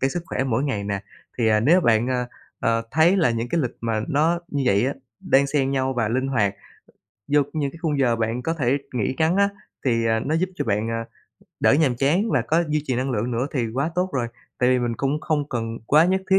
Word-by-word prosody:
cái 135 - +1
sức 175 +4 -3
khỏe 130 - -2
mỗi 130 +1 0
ngày 110 -8 -2
nè. 100 -1 -2 0.4
Thì 115 -2 +3
nếu 170 +8 +5
bạn, 115 -4 +2
ờ, 125 -1 -1 0.3
ờ, 115 0 +1
thấy 165 +5 +4
là 165 -10 +3
những 115 +1 -2
cái 170 - +1
lịch 125 -5 -3
mà 115 -2 -1
nó 160 +4 +2
như 140 -4 -2
vậy 105 +2 +3 0.3
đan 140 -8 +3
xen 135 -1 0
nhau 135 -1 0
và 120 -4 0
linh 130 +4 0
hoạt 105 -7 +1 0.8
vô 145 0 +5
những 145 -3 -1
cái 165 - -13
khung 150 -4 0
giờ 120 -4 +2
bạn 115 +2 -2
có 165 - -1
thể 135 -3 +1 0.2
nghỉ 120 +1 0
ngắn 160 +3 +2
á, 200 0 +4 0.4
thì, 115 -3 +1
ờ, 110 0 +2
nó 150 +7 -1
giúp 180 +3 +1
cho - - -3
bạn, 105 0 0
ờ, 115 - -2 0.7
đỡ - - +5
nhàm 140 -4 +2
chán 165 - +1
và - - +2
có 165 +2 +1
duy 150 0 0
trì 130 - 0
năng 130 +2 -1
lượng 115 0 -1
nữa 120 +2 -1
thì 125 -5 0
quá 140 +5 0
tốt 180 +1 0
rồi. 125 -3 -1 0.3
Tại 125 - +3
vì 130 - +3
mình 120 -1 -1
cũng 140 +3 -1
không 150 -3 -1
cần 115 -3 -3
quá 155 +3 +5
nhất 190 +2 +2
thiết 190 - +6
135 Hz, 245 wpm, -23 LUFS, 115-155 Hz, 0.8 s, thiết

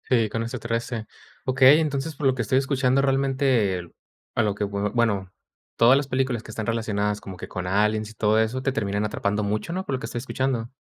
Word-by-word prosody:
Sí, 115 -4 +3
con 115 +2 -2
este 115 - -5
13. 115 -1 -3 0.4
Okey, 130 +3 +6
entonces, 150 0 -2
por 140 - -4
lo 130 -1 +4
que 125 - -2
estoy 115 +4 +1
escuchando 135 -1 +2
realmente, 135 -7 +2
el 85 -1 -9 0.4
a 120 - +2
lo 105 -2 0
que, 105 - -2
bueno, 100 -1 0 0.4
todas 120 +3 +6
las 140 -1 -1
películas, 130 -3 0
que 110 - -11
están 110 0 -4
relacionadas 105 -2 -1
como 95 - -8
que - - -7
con 90 -1 -4
aliens, 105 +2 +1
y - - -12
todo 110 0 +2
eso, 110 +4 0
te 135 - +1
terminan 100 -4 -1
atrapando 105 0 -1
mucho, 105 +11 -2
¿no? 190 +1 -3
Por - - -3
lo - - -4
que - - -5
estoy 120 - -4
escuchando. 125 -2 -2
115 Hz, 220 wpm, -24 LUFS, 105-130 Hz, 0.4 s, Okey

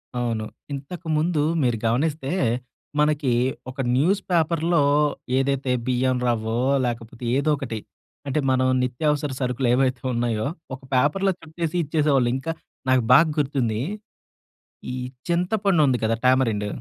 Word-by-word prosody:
అవును. 115 -3 -1 0.3
ఇంతకుముందు 155 +2 -1 0.2
మీరు 120 -2 +1
గమనిస్తే 140 +4 0 0.7
మనకి 150 -3 +2 0.4
ఒక 130 +2 -10 0.2
న్యూస్ 180 +10 +2
పేపర్‌లో 165 -1 +2 0.5
ఏదైతే 135 -1 0 0.2
బియ్యం 130 0 +1
రవ్వో 115 0 -1 0.3
లేకపోతే 115 0 -6
ఏదోకటి 140 -6 -1 0.5
అంటే, 140 +2 0
మనం 130 0 +2 0.2
నిత్యావసర 145 +3 0
సరుకులేవైతే 125 0 +1
ఉన్నాయో, 115 -2 0 0.3
ఒక 130 - -6
పేపర్‌లో 150 +10 +2
చుట్టేసి 165 +1 -4
ఇచ్చేసేవాళ్ళు. 145 -5 +2
ఇంకా 135 +5 -3 0.4
నాకు 130 -1 +4
బాగ్గుర్తుంది. 140 -7 +2 1.1
ఈ - - -4 0.3
చింతపండుంది 175 - +2
కదా! 110 +1 +2
టామరిండ్. 120 -5 +2
135 Hz, 105 wpm, -23 LUFS, 125-155 Hz, 1.1 s, నాకు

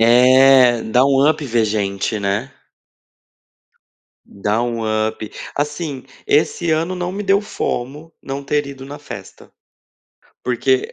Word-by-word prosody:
É, 125 +1 +6
dá 125 +4 +3
um 140 0 +3
up 155 -1 0
ver 115 -4 +1
gente, 105 0 -2
né? 100 +7 -2 1.7
Dá 105 +3 -2
um 120 -1 -2 0.3
up. 110 -1 -6 0.3
Assim, 145 -2 -3 0.2
esse 165 +3 +1
ano 165 +4 0
não 180 0 -3
me 200 +2 -4
deu 195 0 +3
FOMO 150 -4 -4
não 140 +1 -5
ter 145 +1 -1
ido 135 -1 -9
na 145 +2 -9
festa. - - -11 0.9
Porque, 130 +1 0
135 Hz, 125 wpm, -19 LUFS, 115-150 Hz, 1.7 s, É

